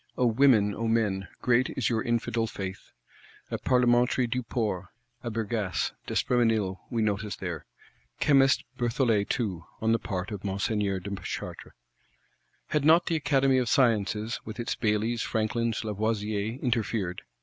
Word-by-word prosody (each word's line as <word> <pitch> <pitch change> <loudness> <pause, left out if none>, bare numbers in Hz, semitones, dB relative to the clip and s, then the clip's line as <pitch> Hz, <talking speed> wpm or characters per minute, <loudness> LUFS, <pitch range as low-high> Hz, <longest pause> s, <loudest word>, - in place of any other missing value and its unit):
O 125 - +3
women, 115 -4 +4
O 115 +2 -2
men, 105 -4 +1 0.2
great 125 +1 +3
is 130 - +1
your 110 -1 +1
infidel 115 -1 0
faith! 95 -3 -7 0.6
A - - -2
Parlementary 125 0 +3
Duport, 115 -6 -2 0.3
a 120 - -4
Bergasse, 110 -3 -1 0.2
D'Espréménil 110 -6 +1
we 115 -2 0
notice 105 0 -1
there; 85 -5 -5 0.5
Chemist 135 -2 +4 0.2
Berthollet 115 -4 +1
too,—on 105 0 -2
the 115 - +3
part 95 0 -4
of 100 -2 -6
Monseigneur 100 0 -1
de 100 +2 -5
Chartres. - - -6 1.0
Had 150 -2 +1
not 160 +4 +6
the 165 - 0
Academy 135 -3 +3
of 125 -2 0
Sciences, 110 -3 +2
with 110 +2 -8
its 120 - -1
Baillys, 110 +2 0
Franklins, 115 +1 -1
Lavoisiers, 110 +1 -2
interfered! 110 -7 -1
115 Hz, 135 wpm, -28 LUFS, 100-120 Hz, 1.0 s, not